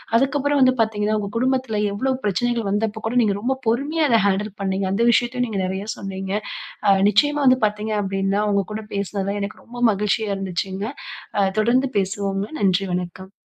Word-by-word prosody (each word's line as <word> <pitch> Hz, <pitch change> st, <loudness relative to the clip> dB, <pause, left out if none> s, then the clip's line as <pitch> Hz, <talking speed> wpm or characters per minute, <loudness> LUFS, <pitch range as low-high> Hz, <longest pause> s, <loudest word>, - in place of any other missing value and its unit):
அதுக்கப்புறம் 280 Hz, +3 st, +2 dB
வந்து 255 Hz, 0 st, +6 dB
பாத்தீங்கன்னா, 215 Hz, -1 st, +1 dB
உங்க 200 Hz, -, -4 dB
குடும்பத்துல 255 Hz, -4 st, 0 dB
எவ்வளவு 260 Hz, +5 st, 0 dB
பிரச்சனைகள் 225 Hz, +2 st, 0 dB
வந்தப்பக்கூட 220 Hz, +2 st, -1 dB
நீங்க 205 Hz, -2 st, +2 dB
ரொம்ப 265 Hz, +3 st, 0 dB
பொறுமையா, 295 Hz, +7 st, +1 dB
அத 230 Hz, -1 st, +5 dB
ஹேண்டில் 200 Hz, +1 st, 0 dB
பண்ணீங்க. 190 Hz, 0 st, -1 dB
அந்த 230 Hz, +4 st, +1 dB
விஷயத்தையும் 245 Hz, +1 st, +1 dB
நீங்க 205 Hz, -3 st, -3 dB
நெறைய 190 Hz, +2 st, -3 dB
சொன்னீங்க. 195 Hz, -1 st, -5 dB, 0.6 s
அ -, -, +6 dB, 0.2 s
நிச்சயமா 290 Hz, +8 st, +3 dB
வந்து 255 Hz, 0 st, +5 dB
பாத்தீங்க 210 Hz, +1 st, -2 dB
அப்பிடீன்னா, 195 Hz, 0 st, 0 dB
உங்ககூட 205 Hz, +2 st, -1 dB
பேசுனதுல 200 Hz, 0 st, -2 dB
எனக்கு 200 Hz, +2 st, -5 dB
ரொம்ப 240 Hz, +1 st, -12 dB
மகிழ்ச்சியா 210 Hz, +1 st, 0 dB
இருந்துச்சுங்க. 190 Hz, +1 st, -3 dB, 0.5 s
அ -, -, +4 dB, 0.2 s
தொடர்ந்து 250 Hz, +4 st, +3 dB
பேசுவோங்க. 195 Hz, +1 st, -2 dB, 0.2 s
நன்றி, 195 Hz, 0 st, +2 dB
வணக்கம். 180 Hz, +2 st, -5 dB
210 Hz, 155 wpm, -22 LUFS, 195-240 Hz, 0.6 s, வந்து